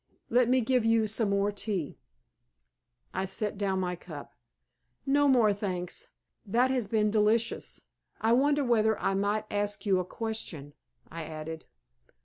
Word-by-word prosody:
Let 245 0 +4
me 255 0 +4
give 250 0 +2
you 225 0 +3
some 215 0 +1
more 200 +1 +1
tea." 200 -6 -3 1.1
I 190 +1 -1
set 200 +2 -3
down 195 -2 0
my 180 -1 -1
cup. 160 -4 -10 0.7
"No 285 +1 +3
more, 235 -6 +5
thanks. 185 -3 -4 0.4
That 240 +5 +2
has 250 -5 0
been 210 -1 +2
delicious. 220 +2 +1 0.4
I 225 +1 +3
wonder 285 +3 +3
whether 220 -3 +2
I - - 0
might 205 +2 0
ask 205 +1 -1
you 190 -2 +3
a - - 0
question?" 180 -10 -4 0.4
I 165 -1 -5
added. 160 +1 -7
210 Hz, 145 wpm, -29 LUFS, 190-230 Hz, 1.1 s, more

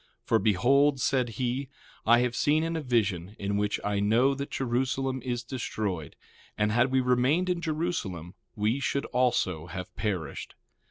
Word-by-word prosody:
1:4 - - -51
For, 115 - +3
behold, 135 +8 +3
said 125 -1 +1
he, 130 +1 -2 0.4
I 120 +1 +6
have 125 -1 0
seen 155 +4 +2
a 160 - -1
vision, 105 - 0
in 100 0 -2
which 105 0 0
I 105 -1 0
know 115 +7 +3
that 140 +1 -5
Jerusalem 130 +1 -1
is 120 -2 -2
destroyed; 105 - -4 0.4
and 105 0 +1
had 120 +4 +3
we 130 0 +2
remained 130 +9 +2
in 175 -1 -2
Jerusalem 155 - -3 0.2
we 110 +5 +1
should 140 0 -1
also 105 -10 0
have 90 +1 -7
perished. 90 -9 -3
120 Hz, 160 wpm, -28 LUFS, 105-135 Hz, 0.4 s, I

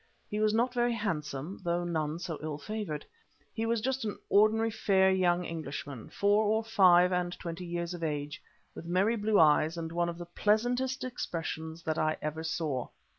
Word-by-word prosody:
He 210 - -1
was 215 0 +3
not 240 +3 +1
very 240 -1 +2
handsome, 155 -5 -3
though 175 0 0
none 160 -2 -1
so 170 -2 -5
ill 155 -1 -4
favoured. 185 -1 -5 0.5
He 225 -1 -2
was 230 -1 +1
just 265 +2 -1
an 210 -2 -3
ordinary 220 +2 +4
fair 190 -2 +3
young 180 -1 +2
Englishman, 145 -6 -6
four 205 +2 +2
or 220 +2 +2
five 180 -5 +5
and 180 0 -1
twenty 170 +1 -6
years 170 0 -3
of 175 -1 -6
age, 150 -1 -3 0.3
with - - -9
merry 190 +6 +2
blue 215 -1 +2
eyes 155 +1 +4
and 165 -1 -4
one 170 0 0
of 170 - -6
the 175 - -7
pleasantest 245 +8 0
expressions 165 -8 -4
that 155 -1 -1
I 155 0 +1
ever 155 +1 -3
saw. 160 -6 -2
175 Hz, 180 wpm, -30 LUFS, 160-215 Hz, 0.5 s, five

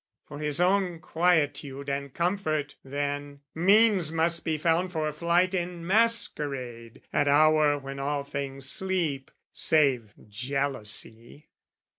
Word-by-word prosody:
For 145 - -9
his 150 0 -2
own 180 -1 +2
quietude 150 -5 0
and 140 0 -3
comfort, 155 -4 -1
then, 145 +1 -4
Means 195 -1 +4
must 165 +1 0
be 160 -1 -1
found 170 +4 +1
for 155 -3 -1
flight 170 +4 +1
in 175 -2 -3
masquerade 145 - -1
At 145 -1 +2
hour 150 0 +4
when 135 -1 -7
all 140 +1 -2
things 140 -1 -5
sleep. 170 -8 -1 0.2
"Save 130 -9 +2
jealousy!" 120 +1 -4
150 Hz, 115 wpm, -27 LUFS, 140-170 Hz, 0.2 s, Means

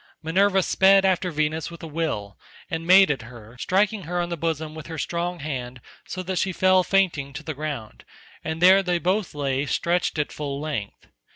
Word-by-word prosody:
Minerva 190 +4 +3
sped 195 +2 +4
after 185 -1 +1
Venus 155 0 -1
with 170 0 -11
a - - -5
will, 145 - -3 0.4
and 165 +1 -3
made 190 -1 +7
at 135 - -2
her, 115 0 -13
striking 205 +5 +1
her 175 +2 -2
on 175 0 -1
the 170 - -2
bosom 160 -1 -3
with 160 -1 -9
her 165 -1 -6
strong 170 +2 -3
hand 130 -4 -5 0.3
so 185 - -5
that 185 -1 -2
she 190 - 0
fell 185 0 +3
fainting 175 -8 +1
to 150 +3 -7
the 155 - -4
ground, 140 -7 -6 0.4
and 160 +1 -3
there 190 +2 +7
they 180 -2 0
both 185 +1 -1
lay 140 -1 -1
stretched 175 +2 0
at 150 - -1
full 140 -2 -4
length. 145 -10 -5
165 Hz, 195 wpm, -24 LUFS, 145-185 Hz, 0.4 s, made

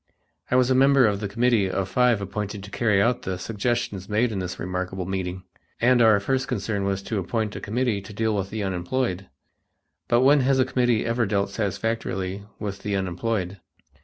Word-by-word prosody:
I - - +1
was 130 0 +4
a - - +6
member 135 0 +5
of 100 -2 +1
the 105 - -3
committee 115 -2 +2
of 95 0 -1
five 120 0 +2
appointed 100 0 -4
to 100 - -10
carry 105 -5 +2
out 120 +4 +2
the 95 -1 -3
suggestions 110 0 -2
made 110 +3 +2
in 100 - -3
this 90 0 -4
remarkable 90 +1 -3
meeting, 95 -1 -3 0.4
and 120 +1 +4
or 110 -3 +6
first 130 +6 -1
concern 105 -4 -2
was 100 0 -1
to 110 -1 -2
appoint 105 +3 -2
a - - -6
committee 110 -1 -1
to 100 - -11
deal 110 +1 0
with 95 -1 -2
the 110 0 -3
unemployed. 95 +1 -2 0.8
But 120 +1 +3
when 140 +3 +6
has 135 0 +2
a 130 - +4
committee 125 -4 +1
ever 115 -1 +1
dealt 100 -1 0
satisfactorily 100 -2 -3
with 100 -2 -5
the 105 -1 -2
unemployed? 95 +1 -2
105 Hz, 190 wpm, -24 LUFS, 95-120 Hz, 0.8 s, a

